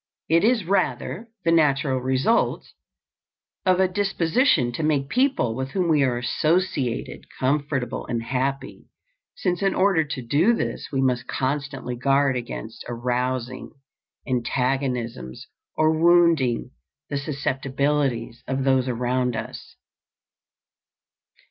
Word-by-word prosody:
It 165 Hz, +3 st, +4 dB
is 225 Hz, -3 st, +3 dB
rather 190 Hz, -, -1 dB, 0.2 s
the 165 Hz, -, +4 dB
natural 140 Hz, -5 st, +2 dB
result 130 Hz, -, +1 dB, 1.0 s
of 185 Hz, 0 st, +4 dB
a 190 Hz, -, +4 dB
disposition 185 Hz, -, +2 dB
to 120 Hz, -, -4 dB
make 145 Hz, -3 st, 0 dB
people 255 Hz, -, +1 dB
with 130 Hz, +1 st, -3 dB
whom 180 Hz, -3 st, 0 dB
we 155 Hz, -3 st, +4 dB
are 125 Hz, -3 st, +2 dB
associated 155 Hz, -1 st, -1 dB
comfortable 135 Hz, -2 st, -1 dB
and 120 Hz, -2 st, -2 dB
happy, 135 Hz, +2 st, -3 dB, 0.5 s
since 180 Hz, -1 st, -1 dB
in 195 Hz, -1 st, +1 dB
order 190 Hz, -4 st, +3 dB
to 145 Hz, -3 st, -5 dB
do 155 Hz, -, +3 dB
this -, -, -3 dB
we 135 Hz, -2 st, 0 dB
must 125 Hz, -2 st, 0 dB
constantly 135 Hz, -2 st, -3 dB
guard 135 Hz, +2 st, +2 dB
against 65 Hz, -, -6 dB
arousing 125 Hz, +1 st, -2 dB, 0.5 s
antagonisms 125 Hz, -, -2 dB, 0.3 s
or 155 Hz, 0 st, +4 dB
wounding 160 Hz, -7 st, +3 dB, 0.4 s
the 140 Hz, -, 0 dB
susceptibilities 135 Hz, -3 st, -1 dB
of 135 Hz, 0 st, -1 dB
those 130 Hz, -1 st, +2 dB
around 125 Hz, 0 st, 0 dB
us. -, -, -7 dB
135 Hz, 115 wpm, -24 LUFS, 125-160 Hz, 1.0 s, It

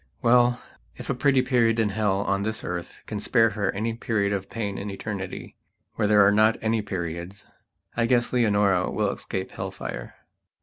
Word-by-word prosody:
Well, 120 Hz, +1 st, +4 dB, 0.4 s
if -, -, -5 dB
a -, -, +1 dB
pretty 135 Hz, 0 st, +3 dB
period 115 Hz, -3 st, +2 dB
in 110 Hz, -2 st, +2 dB
hell 100 Hz, -1 st, 0 dB
on 100 Hz, 0 st, 0 dB
this 110 Hz, +2 st, -3 dB
earth 85 Hz, -1 st, -5 dB
can 105 Hz, -, -4 dB
spare 115 Hz, +1 st, +3 dB
her 105 Hz, -3 st, -1 dB
any 110 Hz, +3 st, -2 dB
period 105 Hz, -3 st, -1 dB
of 95 Hz, -1 st, -3 dB
pain 100 Hz, -4 st, -3 dB
in 105 Hz, -, -5 dB
Eternitywhere 100 Hz, +1 st, -6 dB
there 105 Hz, -1 st, +6 dB
are 100 Hz, -, +5 dB
not 110 Hz, +2 st, +4 dB
any 110 Hz, 0 st, 0 dB
periodsI 95 Hz, +5 st, -6 dB
guess 120 Hz, 0 st, +2 dB
Leonora 100 Hz, -6 st, +2 dB
will -, -, 0 dB
escape 95 Hz, 0 st, -5 dB
hell -, -, -5 dB
fire. -, -, -7 dB
105 Hz, 170 wpm, -25 LUFS, 100-115 Hz, 0.4 s, there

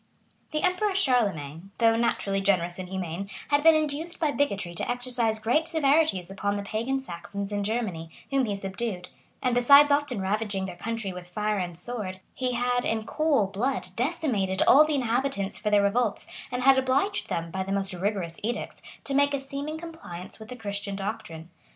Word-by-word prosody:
The 305 Hz, -, -2 dB
emperor 375 Hz, +2 st, +1 dB
Charlemagne, 195 Hz, -, +1 dB
though 225 Hz, -1 st, +4 dB
naturally 200 Hz, -4 st, 0 dB
generous 180 Hz, -3 st, +1 dB
and 185 Hz, -1 st, -6 dB
humane, 190 Hz, 0 st, -4 dB, 0.2 s
had 285 Hz, 0 st, +3 dB
been 325 Hz, +1 st, +7 dB
induced 310 Hz, +2 st, -1 dB
by 310 Hz, -3 st, +2 dB
bigotry 200 Hz, -12 st, -1 dB
to 170 Hz, -, -3 dB
exercise 245 Hz, -2 st, 0 dB
great 245 Hz, +9 st, +1 dB
severities 295 Hz, -, +2 dB
upon 200 Hz, +1 st, -1 dB
the 200 Hz, -, -3 dB
pagan 230 Hz, +6 st, -1 dB
Saxons 200 Hz, -2 st, -6 dB
in 205 Hz, 0 st, -1 dB
Germany, 200 Hz, -7 st, -2 dB, 0.2 s
whom 270 Hz, -2 st, +2 dB
he 205 Hz, -3 st, -2 dB
subdued; 195 Hz, -1 st, -4 dB, 0.3 s
and 250 Hz, -1 st, +2 dB
besides 280 Hz, +4 st, +7 dB
often 285 Hz, -5 st, +1 dB
ravaging 200 Hz, 0 st, -1 dB
their 180 Hz, -2 st, -6 dB
country 220 Hz, +1 st, -3 dB
with 180 Hz, 0 st, -9 dB
fire 210 Hz, +2 st, -1 dB
and 175 Hz, -2 st, -4 dB
sword, 190 Hz, -2 st, -4 dB
he 255 Hz, -1 st, -1 dB
had, 245 Hz, 0 st, +1 dB
in 220 Hz, -1 st, -1 dB
cool 305 Hz, -7 st, +2 dB
blood, 215 Hz, +2 st, -2 dB
decimated 235 Hz, -, 0 dB
all 295 Hz, -, +9 dB
the 305 Hz, -1 st, 0 dB
inhabitants 245 Hz, -5 st, -1 dB
for 210 Hz, -, -1 dB
their 205 Hz, -1 st, +4 dB
revolts, 215 Hz, +2 st, +1 dB, 0.3 s
and 250 Hz, 0 st, -2 dB
had 270 Hz, 0 st, +6 dB
obliged 275 Hz, +11 st, 0 dB
them, 165 Hz, 0 st, -2 dB
by 190 Hz, -, -2 dB
the 190 Hz, +1 st, -3 dB
most 195 Hz, -1 st, -1 dB
rigorous 180 Hz, -2 st, -2 dB
edicts, 235 Hz, +3 st, -4 dB, 0.2 s
to 275 Hz, -, -4 dB
make 285 Hz, +1 st, +3 dB
a -, -, -2 dB
seeming 280 Hz, +3 st, -5 dB
compliance 315 Hz, -, -8 dB
with 220 Hz, +1 st, -11 dB
the 250 Hz, -, -6 dB
Christian 200 Hz, -3 st, -4 dB
doctrine. 180 Hz, -5 st, -6 dB
220 Hz, 180 wpm, -27 LUFS, 195-270 Hz, 0.3 s, all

